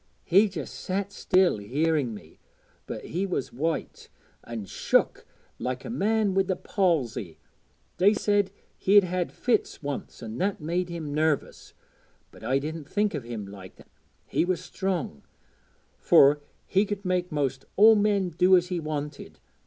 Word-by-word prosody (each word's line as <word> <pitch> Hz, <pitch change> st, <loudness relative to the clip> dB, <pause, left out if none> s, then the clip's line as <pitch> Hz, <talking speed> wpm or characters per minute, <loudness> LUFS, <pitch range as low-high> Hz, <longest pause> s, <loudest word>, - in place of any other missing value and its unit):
He 195 Hz, +4 st, +4 dB
just 155 Hz, -9 st, -6 dB
sat 200 Hz, +1 st, -3 dB
still 185 Hz, -, +2 dB
hearing 140 Hz, +4 st, 0 dB
me, -, -, -14 dB, 0.5 s
but -, -, -6 dB
he 190 Hz, +4 st, -2 dB
was 175 Hz, -8 st, -3 dB
white, 160 Hz, +6 st, -3 dB, 0.3 s
an' 115 Hz, -3 st, -6 dB
shook -, -, 0 dB, 0.3 s
like 125 Hz, 0 st, -3 dB
a -, -, -5 dB
man 215 Hz, -2 st, +1 dB
wi' 195 Hz, -, +4 dB
the 190 Hz, 0 st, -1 dB
palsy. 135 Hz, -, -1 dB, 0.6 s
They 200 Hz, +4 st, +5 dB
said 205 Hz, -2 st, +2 dB, 0.3 s
he'd 200 Hz, +1 st, +6 dB
had 180 Hz, -1 st, -2 dB
fits 230 Hz, -9 st, -1 dB
once 140 Hz, -3 st, -5 dB
an' 115 Hz, +1 st, -6 dB
that 195 Hz, +1 st, 0 dB
made 175 Hz, +3 st, -2 dB
him 160 Hz, -4 st, -5 dB
nervous, 155 Hz, -1 st, -1 dB, 0.6 s
but -, -, -15 dB
I 130 Hz, -, +1 dB
didn't 150 Hz, +1 st, -5 dB
think 210 Hz, 0 st, +1 dB
o' 150 Hz, -, -1 dB
him 115 Hz, -3 st, -6 dB
like 100 Hz, -2 st, -11 dB
that. -, -, -19 dB, 0.3 s
He -, -, 0 dB
was 180 Hz, 0 st, 0 dB
strong, 180 Hz, -, -3 dB, 0.8 s
fur 145 Hz, +2 st, +6 dB, 0.2 s
he 195 Hz, +1 st, +2 dB
could 205 Hz, -1 st, -4 dB
make 180 Hz, -1 st, 0 dB
most 135 Hz, -3 st, -2 dB
all 220 Hz, +3 st, +8 dB
men 205 Hz, -3 st, +2 dB
do 180 Hz, +3 st, +5 dB
as 180 Hz, 0 st, -1 dB
he 180 Hz, -2 st, -1 dB
wanted. 150 Hz, -2 st, -5 dB
175 Hz, 155 wpm, -27 LUFS, 140-195 Hz, 0.8 s, all